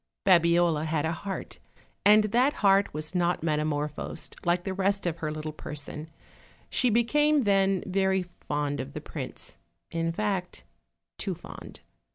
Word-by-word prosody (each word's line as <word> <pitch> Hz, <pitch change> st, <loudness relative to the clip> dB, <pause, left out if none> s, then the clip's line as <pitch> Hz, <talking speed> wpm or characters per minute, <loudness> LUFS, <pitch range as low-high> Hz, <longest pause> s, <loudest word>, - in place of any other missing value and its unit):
Babiola 170 Hz, -3 st, +4 dB
had 155 Hz, -1 st, 0 dB
a 160 Hz, -, 0 dB
heart, 190 Hz, +4 st, -5 dB, 0.4 s
and 210 Hz, +1 st, +7 dB
that 245 Hz, +7 st, +3 dB
heart 195 Hz, 0 st, +5 dB
was 155 Hz, +2 st, -4 dB
not 175 Hz, -2 st, +1 dB
metamor 150 Hz, -2 st, 0 dB
phosed 150 Hz, -, -7 dB
like 175 Hz, 0 st, +1 dB
the 190 Hz, -, -2 dB
rest 195 Hz, +1 st, 0 dB
of 170 Hz, -2 st, -1 dB
her 155 Hz, -2 st, -3 dB
little 155 Hz, 0 st, -4 dB
person; 150 Hz, +1 st, -6 dB, 0.6 s
she 250 Hz, -, +3 dB
became, 295 Hz, +6 st, +3 dB
then, 195 Hz, -2 st, +3 dB
very 190 Hz, 0 st, +1 dB, 0.2 s
fond 145 Hz, -1 st, -2 dB
of 70 Hz, -, -5 dB
the -, -, -5 dB
prince -, -, -6 dB, 0.3 s
in 165 Hz, 0 st, 0 dB
fact, 190 Hz, -1 st, -2 dB, 0.6 s
too -, -, -2 dB
fond. -, -, -11 dB
175 Hz, 150 wpm, -28 LUFS, 155-200 Hz, 0.6 s, and